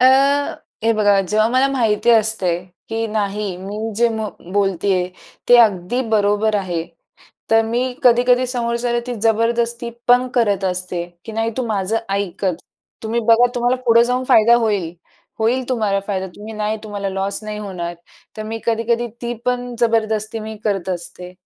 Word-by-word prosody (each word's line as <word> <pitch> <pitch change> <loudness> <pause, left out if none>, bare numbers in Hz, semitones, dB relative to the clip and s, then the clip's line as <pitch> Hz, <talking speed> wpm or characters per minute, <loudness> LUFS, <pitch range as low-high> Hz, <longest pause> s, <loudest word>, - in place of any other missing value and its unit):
अ, 255 - +5 0.8
हे 230 - +4
बघा 205 -2 +3
जेव्हा 215 +1 +3
मला 260 +3 +3
माहिती 235 -3 +2
असते, 220 -6 +2 0.3
की 225 0 -2
नाही 205 -3 -2
मी 210 +4 -5
जे 235 0 +4
म 220 -1 -3 0.3
बोलते 195 -1 +1
आहे, 180 0 0 0.4
ते 245 - +8
अगदी 210 +1 +3
बरोबर 210 0 +2
आहे. 175 -4 -2 0.7
तर 225 0 +5
मी 235 +3 0 0.2
कधी-कधी 245 +1 +4
समोरच्याला 240 -1 -1
ती 245 - -3
जबरदस्ती 235 +1 +1 0.2
पण 245 +1 +5
करत 205 -5 +2
असते, 180 -1 -2 0.2
की 220 - -7
नाही 225 +1 -1
तू 255 -2 -1
माझा 215 +1 0 0.2
ऐकच. 190 -3 -2 0.4
तुम्ही 230 +1 -1
बघा 235 +2 +6
तुम्हाला 245 +1 +1
पुढं 230 0 +6
जाऊन 250 +2 0
फायदा 230 +2 +6
होईल, 195 -6 -1 0.5
होईल 240 +3 0
तुम्हाला 215 -6 0
फायदा 190 -2 -2
तुम्ही 215 +2 -8
नाही 215 +1 -1
तुम्हाला 205 -2 -4
लॉस 195 +2 -2
नाही 210 0 -5
होणार. 180 -4 -5 0.4
तर 215 - -4
मी 225 +1 -5
कधी-कधी 230 +1 0
ती 240 0 -2
पण 245 -1 -2
जबरदस्ती 220 -1 0
मी 220 0 -7
करत 195 -4 -1
असते. 180 0 -6
220 Hz, 160 wpm, -19 LUFS, 200-235 Hz, 0.8 s, ते